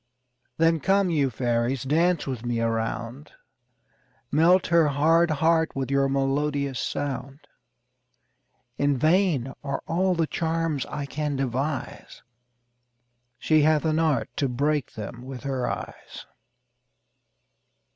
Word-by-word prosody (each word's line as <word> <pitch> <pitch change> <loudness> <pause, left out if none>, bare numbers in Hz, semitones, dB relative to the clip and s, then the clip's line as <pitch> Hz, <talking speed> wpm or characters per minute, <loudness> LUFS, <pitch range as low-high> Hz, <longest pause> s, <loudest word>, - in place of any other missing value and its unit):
Then 165 0 +3
come, 195 +4 +2
you 145 -4 +2
fairies, 120 +1 -1
dance 165 +5 +1
with 130 -4 -5
me 120 -1 -2
a 115 0 +1
round; 115 +4 -4 1.0
Melt 170 +5 +4
her 165 -2 +4
hard 160 +4 +3
heart 160 +1 +1
with 135 -1 -3
your 140 0 +2
melodious 140 -1 -1
sound. 140 +1 -4 1.4
In 140 -1 +2
vain 155 -4 +2
are 140 -1 -3
all 185 +2 +1
the 165 -1 +1
charms 160 -3 -2
I 145 -1 -4
can 150 0 -3
devise; 135 +2 -4 1.1
She 155 -1 +3
hath 155 +1 +3
an 155 0 +1
art 155 -6 0
to 140 - 0
break 145 +2 -1
them 110 +3 -7
with 130 0 -8
her 135 -3 -2
eyes. - - -7
145 Hz, 120 wpm, -25 LUFS, 130-160 Hz, 1.4 s, Melt